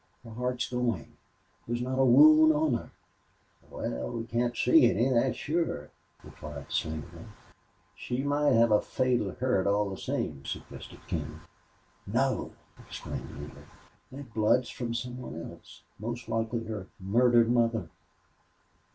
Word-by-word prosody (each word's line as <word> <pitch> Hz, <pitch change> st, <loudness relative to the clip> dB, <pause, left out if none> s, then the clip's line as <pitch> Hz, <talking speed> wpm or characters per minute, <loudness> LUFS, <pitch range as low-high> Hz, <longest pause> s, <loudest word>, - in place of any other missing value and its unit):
Her 115 Hz, -, -11 dB
heart's 125 Hz, +2 st, -2 dB
going! 120 Hz, -, -2 dB, 0.5 s
There's 120 Hz, +1 st, -2 dB
not 130 Hz, +1 st, -2 dB
a -, -, +5 dB
wound 155 Hz, +5 st, +8 dB
on 150 Hz, -2 st, +1 dB
her!" 115 Hz, -, -3 dB, 0.8 s
"Wal, 60 Hz, 0 st, -4 dB
we 115 Hz, -1 st, -4 dB
can't 120 Hz, +1 st, -1 dB
see 325 Hz, -1 st, +6 dB
any, 120 Hz, -, +2 dB
thet's 125 Hz, +1 st, +2 dB
sure," 155 Hz, -, -2 dB, 0.3 s
replied 75 Hz, -2 st, -9 dB
Slingerland. 80 Hz, -1 st, -4 dB, 0.7 s
"She 125 Hz, +2 st, -3 dB
might 145 Hz, +1 st, +2 dB
hev 115 Hz, 0 st, +4 dB
a 105 Hz, -, +5 dB
fatal 125 Hz, -5 st, 0 dB
hurt, 125 Hz, -7 st, 0 dB
all 100 Hz, 0 st, +1 dB
the 95 Hz, -, -5 dB
same," 70 Hz, -2 st, -3 dB
suggested -, -, -8 dB
King. -, -, -4 dB, 0.7 s
"No!" 130 Hz, +4 st, 0 dB, 0.3 s
exclaimed -, -, -7 dB
Neale. -, -, -10 dB, 0.5 s
"That 130 Hz, -3 st, -10 dB
blood's 115 Hz, +3 st, +2 dB
from 120 Hz, -3 st, -4 dB
some 125 Hz, +1 st, -4 dB
one 80 Hz, -10 st, -7 dB
else -, -, -15 dB, 0.2 s
most 120 Hz, +2 st, -5 dB
likely 115 Hz, +1 st, -1 dB
her 105 Hz, -4 st, -5 dB
murdered 120 Hz, +4 st, +4 dB
mother.... 115 Hz, -2 st, +1 dB
120 Hz, 135 wpm, -29 LUFS, 110-130 Hz, 0.8 s, wound